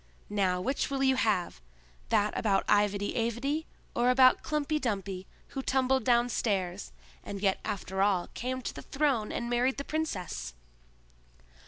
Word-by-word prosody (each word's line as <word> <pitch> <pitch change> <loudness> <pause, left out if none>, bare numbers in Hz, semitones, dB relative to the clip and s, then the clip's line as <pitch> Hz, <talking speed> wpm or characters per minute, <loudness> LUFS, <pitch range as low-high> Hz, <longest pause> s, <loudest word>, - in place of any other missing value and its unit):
Now 190 -3 +1
which 265 +10 -1
will 270 -1 -1
you 265 0 +4
have; 200 - 0 0.5
that 210 +1 +2
about 195 -3 +1
IvedyAvedy, 230 +8 +1 0.3
or 240 +1 +3
about 255 0 +6
Klumpy 300 0 -1
Dumpy 195 -5 -3 0.2
who 270 - -4
tumbled 265 -2 +1
downstairs, 215 - +1 0.3
and 200 - -6
yet 195 -1 +1
after 190 -1 -3
all 195 -3 +3
came 255 +1 -3
to - - -4
the - - -8
throne 270 -7 0
and 235 - -3
married 245 +2 +1
the 280 - -3
princess?" 185 - -3
235 Hz, 140 wpm, -30 LUFS, 195-265 Hz, 0.5 s, about